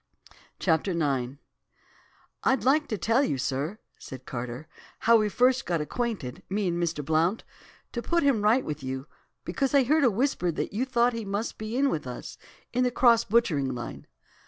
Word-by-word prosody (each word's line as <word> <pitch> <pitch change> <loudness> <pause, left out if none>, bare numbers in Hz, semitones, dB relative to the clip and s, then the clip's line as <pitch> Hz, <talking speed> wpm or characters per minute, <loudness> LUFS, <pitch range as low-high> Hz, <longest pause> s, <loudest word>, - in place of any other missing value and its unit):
CHAPTER 170 +2 +1
IX 135 -6 0 1.1
"'I'D 265 - +2
like 300 +4 +3
to 215 - -2
tell 230 +6 +2
you, 145 - 0
sir,' 140 +9 -2 0.2
said 130 -1 -10
Carter, 125 +4 -6 0.3
'how 230 +1 +6
we 215 -1 +1
first 255 +4 +2
got 170 -2 +1
acquainted, 195 - -3
me 200 0 0
and 170 0 -1
Mr. 160 -4 -2
Blount, 160 +7 +1 0.5
to 240 - -3
put 340 +5 +1
him 275 -7 +3
right 225 +5 +3
with 150 0 -4
you, 130 0 -4 0.4
because 275 0 0
I 275 - +6
heard 300 +4 +3
a 250 - +6
whisper 225 -5 0
that - - -3
you 235 +6 0
thought 245 -2 +2
he 230 -1 -4
must 205 +3 -3
be 220 +3 -4
in 275 0 +3
with 150 -5 -3
us, - - -8 0.3
in 250 +1 +2
the 250 - +3
"cross" 235 -2 +4
butchering 160 - +1
line. 120 - -7
210 Hz, 180 wpm, -27 LUFS, 150-245 Hz, 1.1 s, how